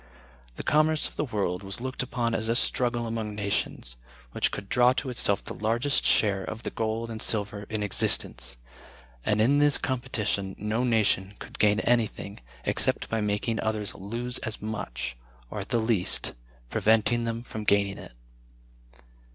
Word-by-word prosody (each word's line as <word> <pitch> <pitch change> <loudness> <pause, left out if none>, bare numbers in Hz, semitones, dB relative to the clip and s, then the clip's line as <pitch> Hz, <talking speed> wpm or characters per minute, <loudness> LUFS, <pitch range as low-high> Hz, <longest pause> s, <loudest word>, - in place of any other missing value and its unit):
The - - -6
commerce 155 0 +3
of - - -14
the 150 - -1
world 100 -7 -2
was 100 +3 -5
looked 130 +1 -3
upon 120 -2 -1
as 110 0 0
a 115 - +2
struggle 120 -1 +1
among 110 -2 -3
nations, 100 - -2 0.3
which - - +1
could 100 - -6
draw 125 +4 +4
to 130 0 -3
itself 100 -5 +3
the - - -6
largest 115 +6 +1
share 100 -3 +4
of 110 +4 -6
the - - -3
gold 115 +1 -2
and 110 -1 -5
silver 105 -1 0
in 110 -1 -2
existence; 60 -10 0 0.7
and 105 0 +1
in 135 +7 +4
this 145 -1 +6
competition 115 -7 -1
no 110 +4 -1
nation 105 -4 +2
could - - -11
gain 105 +1 +4
anything, 115 -4 0 0.3
except - - +1
by 110 -1 0
making 105 +2 -1
others 110 -1 -2
lose 120 +6 -3
as 110 -5 -3
much, 105 - -4 0.3
or, - - -4
at - - -6
the 120 - +2
least, 110 -5 +1 0.4
preventing 115 +2 +3
them 115 0 -3
from 110 -3 -6
gaining 100 -1 +2
it. - - -11
110 Hz, 165 wpm, -27 LUFS, 100-120 Hz, 0.7 s, this